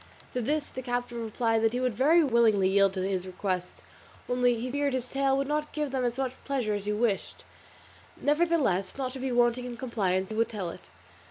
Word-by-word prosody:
To 250 - -1
this 295 +5 0
the 260 - -7
captive 245 -1 -3
replied 225 0 0
that 225 0 +2
he 250 - 0
would 255 -2 0
very 310 +9 +4
willingly 230 -7 +4
yield 195 0 +4
to 190 0 -1
his 190 -1 -2
request, 185 -1 -4 0.4
only 245 -1 +2
he 250 +2 -3
feared 285 0 0
his 255 -1 -1
tale 270 0 +2
would 275 0 -1
not 300 +1 -2
give 300 -3 -2
them 265 -1 -1
as 240 +1 -1
much 260 -2 -1
pleasure 255 -7 -1
as 205 -1 -3
he 210 - 0
wished; 210 -2 -1 0.8
nevertheless, 295 - +1
not 260 -2 -2
to 265 - -7
be 260 0 -2
wanting 240 0 +2
in 245 -1 -6
compliance, 195 -6 -1
he 215 - -5
would 230 +1 +1
tell 190 -6 -4
it. - - -13
245 Hz, 210 wpm, -28 LUFS, 210-270 Hz, 0.8 s, very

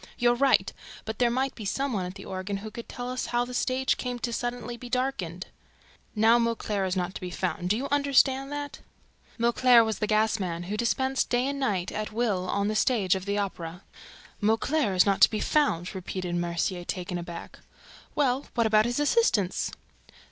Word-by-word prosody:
"You're 240 0 +4
right! 270 +3 +3 0.3
But 220 0 -5
there 245 -1 +4
might 260 +3 0
be 220 - -9
some 270 +7 -1
one 185 -4 -1
at 180 - -8
the 195 - -10
organ 190 +2 -4
who 215 +2 -8
could 235 +1 -9
tell 245 0 -5
us 255 - -3
how 240 0 +1
the 250 - -8
stage 260 +1 +1
came 250 -1 -3
to 240 - -3
be - - -4
suddenly 240 0 -3
darkened. 245 -8 -3 0.7
Now 225 +2 +5
Mauclair 220 -4 -1
is 185 0 -1
nowhere 180 0 -1
to - - -8
be 180 - -4
found. 180 0 -2
Do 210 - +2
you 275 +3 -3
understand 275 -1 +3
that?" 290 0 -5 0.6
Mauclair 235 0 +5
was 220 -2 -2
the 210 - 0
gas 215 0 +2
man, 175 -3 -3
who 195 +4 -4
dispensed 260 +4 0
day 245 +1 +2
and 280 0 -3
night 200 -10 -1
at 215 0 -4
will 210 -5 -1
on 200 0 0
the 215 - 0
stage 210 -6 +2
of 190 -1 -3
the 200 0 -1
Opera. 180 -3 -4 0.6
"Mauclair 225 +1 +1
is 180 - +6
not 200 -1 +1
to - - +9
be 215 - -2
found!" 210 - +1
repeated 185 -1 -4
Mercier, 175 +1 -1
taken 180 0 -4
aback. 170 0 -8 0.6
"Well, 270 -2 +1
what 230 -2 +2
about 215 0 +4
his 240 +3 -1
assistants?" 290 - +2
220 Hz, 200 wpm, -27 LUFS, 190-250 Hz, 0.7 s, to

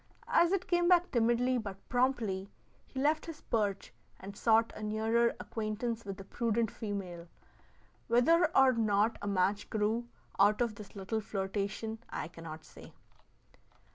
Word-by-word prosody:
As 340 0 +5
it 385 -2 0
came 350 -1 +2
back 355 0 +4
timidly 240 +1 +2
but 200 -3 -8
promptly, 235 -7 0 0.4
he 265 - -6
left 305 +4 +1
his 320 -2 -8
perch 205 -4 -1 0.3
and 200 +1 -9
sought 225 +1 +3
a - - -8
nearer 220 +2 +1
acquaintance 225 +1 -3
with 195 -1 -5
the 195 - -8
prudent 230 +1 -1
female. 190 -6 -5 0.8
Whether 325 +9 +4
or 265 -1 +7
not 215 -1 +1
a 205 - -4
match 200 +1 0
grew 220 +3 0 0.3
out 205 +2 +5
of 235 -3 +1
this 205 -1 -12
little 200 +3 -2
flirtation 205 +2 -3
I 150 - -4
cannot 165 -2 -9
say. - - -14
220 Hz, 145 wpm, -32 LUFS, 200-240 Hz, 0.8 s, or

